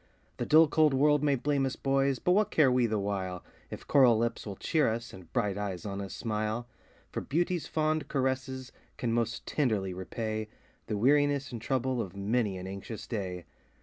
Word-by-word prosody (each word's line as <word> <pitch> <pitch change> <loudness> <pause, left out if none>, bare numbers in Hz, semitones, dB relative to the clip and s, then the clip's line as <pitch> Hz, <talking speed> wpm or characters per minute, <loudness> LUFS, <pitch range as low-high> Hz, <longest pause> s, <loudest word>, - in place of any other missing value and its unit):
The - - -3
dull, 160 +1 +7
cold 155 -2 +3
world 150 +1 +4
may 145 -2 +3
blame 140 +2 0
us, 135 -1 -1
boys! 135 0 +1
but 180 - +1
what 210 +3 +3
care 145 -5 +4
we 125 -1 +3
the 110 -1 0
while, 95 -3 -3 0.3
If - - -8
coral 125 -5 +5
lips 115 0 -1
will 100 - -5
cheer 155 - +1
us, 115 +1 -5
and 90 -3 -13
bright 105 -5 0
eyes 95 -3 -4
on 100 -1 -4
us 100 -2 -6
smile? 110 +1 -2 0.4
For - - -3
beauty's 175 +3 -1
fond 155 0 0
caresses 130 -1 -2 0.3
can 115 -2 -1
most 115 -1 -1
tenderly 105 -10 0
repay 110 +4 -4 0.4
The 105 - -1
weariness 145 +3 +3
and 120 -2 -6
trouble 130 0 0
of 95 -3 -6
many 105 0 0
an 90 - -7
anxious 100 +3 -7
day. 90 -6 -4
120 Hz, 185 wpm, -30 LUFS, 105-140 Hz, 0.4 s, dull